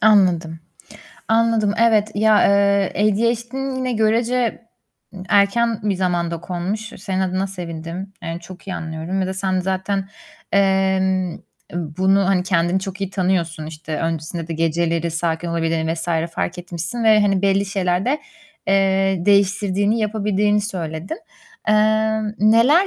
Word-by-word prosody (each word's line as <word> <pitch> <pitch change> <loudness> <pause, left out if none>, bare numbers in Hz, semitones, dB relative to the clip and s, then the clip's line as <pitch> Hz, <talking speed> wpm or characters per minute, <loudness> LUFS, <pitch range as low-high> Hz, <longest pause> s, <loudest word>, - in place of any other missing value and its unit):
Anladım. 180 -6 +3 0.7
Anladım. 225 -2 +2
Evet, 220 -2 +3
ya, 215 0 +4
eee, 200 -1 +3 0.2
ADHD'n 235 +5 -1
yine 255 -1 -1
görece 230 +1 +1 0.6
erken 220 +3 +3
bir 205 -1 0
zamanda 175 -2 -1
konmuş. 180 +4 -3 0.2
Senin 190 -1 -2
adına 190 +1 0
sevindim. 175 0 -7
Yani 165 0 -5
çok 180 +2 -12
iyi 185 - -3
anlıyorum. 160 +4 -4
Bir 190 - 0
de 190 - -3
sen 190 -1 0
zaten, 190 +1 -2 0.4
emm, 190 -2 +2 0.4
bunu, 185 +4 +1
hani, 190 -2 +2
kendini 180 0 +1
çok 195 +1 -6
iyi 195 -1 -2
tanıyorsun. 175 -5 -1
İşte, 155 0 -6
öncesinde 165 0 -3
de - - -3
geceleri 165 +1 0
sakin 165 +1 -2
olabildiğini 165 -1 0
vs. 165 +1 -6 0.3
fark 180 - -2
etmişsin 175 +6 -4
ve, 215 -1 +6
hani, 195 -2 +2
belli 195 0 +2
şeylerde, 195 +8 0 0.5
eee, 195 -1 +2
değiştirdiğini, 200 +1 +2
yapabildiğini 210 -1 +1
söyledin. 180 - -5 0.5
Emm, 215 0 +2
neler 230 - +5
190 Hz, 130 wpm, -20 LUFS, 175-210 Hz, 0.7 s, ve